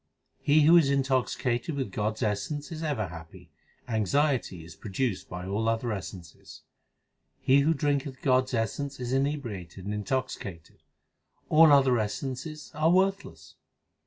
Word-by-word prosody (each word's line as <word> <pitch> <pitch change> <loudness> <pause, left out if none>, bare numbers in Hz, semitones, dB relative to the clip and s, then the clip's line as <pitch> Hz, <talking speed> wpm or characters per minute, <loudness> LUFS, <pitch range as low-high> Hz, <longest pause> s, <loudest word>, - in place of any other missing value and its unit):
He 150 +2 +4
who 165 +3 +7
is 155 -5 +4
intoxicated 130 0 0
with 130 -8 -3
God 105 +2 -1
s 115 - -4
essence 110 +9 -2
is 160 -1 -6
ever 135 - -2
happy; 80 -1 -12 0.4
Anxiety 115 - 0
is 85 0 -12
produced 110 +1 -3
by 90 0 -6
all 105 +4 0
other 115 +1 -1
essences. 90 -4 -8 0.8
He 135 +2 +4
who 155 +3 +2
drinketh 140 -2 -1
God 130 -1 +3
s 130 - -4
essence 135 +5 -2
is 125 0 -3
inebriated 120 - -3
and 105 - -3
intoxi 130 +6 -2
cated; 85 -8 -10 0.7
All 160 0 +7
other 135 -4 +5
essences 135 +8 -4
are 155 +1 +2
worthless. 195 +2 0
130 Hz, 145 wpm, -28 LUFS, 105-145 Hz, 0.8 s, who